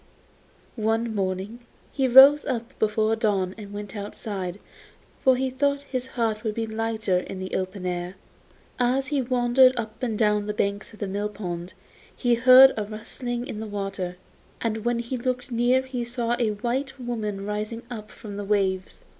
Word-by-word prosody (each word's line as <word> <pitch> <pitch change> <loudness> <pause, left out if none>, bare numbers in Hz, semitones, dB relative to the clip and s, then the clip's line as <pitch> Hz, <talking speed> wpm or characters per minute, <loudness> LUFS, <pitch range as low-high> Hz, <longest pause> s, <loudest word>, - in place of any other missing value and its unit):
One 225 +1 0
morning 195 +3 -2 0.3
he 270 -2 +1
rose 270 +4 +9
up 235 +1 -3
before 215 +1 +2
dawn 200 -5 0
and 205 -2 -10
went 205 +1 -7
outside, 200 -2 -5 0.6
for 260 -2 +6
he 260 +1 -1
thought 280 +2 +1
his 255 -2 -4
heart 225 -4 -1
would 215 -2 -2
be 230 - -1
lighter 220 -4 -1
in 185 - -7
the 185 0 -6
open 185 0 -3
air. 180 +1 -3 0.6
As 255 +2 +2
he 280 -1 0
wandered 255 +1 +4
up 220 -2 -6
and 230 -4 -1
down 210 -1 +3
on 205 - -3
the 210 - -2
banks 200 0 -1
of 215 - -14
the 205 - -3
mill 205 +2 -2
pond 180 -3 -6 0.4
he 245 -1 +2
heard 255 +3 +8
a 215 - 0
rustling 240 +3 -5
in 215 - -6
the 220 - -5
water, 195 -3 -4 0.4
and 220 -2 -2
when 240 0 +1
he 235 +2 -3
looked 250 +1 -3
near 245 +2 +3
he 260 -2 -4
saw 240 0 -1
a 235 -3 +2
white 260 +5 -3
woman 215 -5 -3
rising 210 +3 -4
up 215 -3 -7
from 205 -2 -9
the 205 - -4
waves. 195 -2 -1
220 Hz, 180 wpm, -25 LUFS, 205-245 Hz, 0.6 s, rose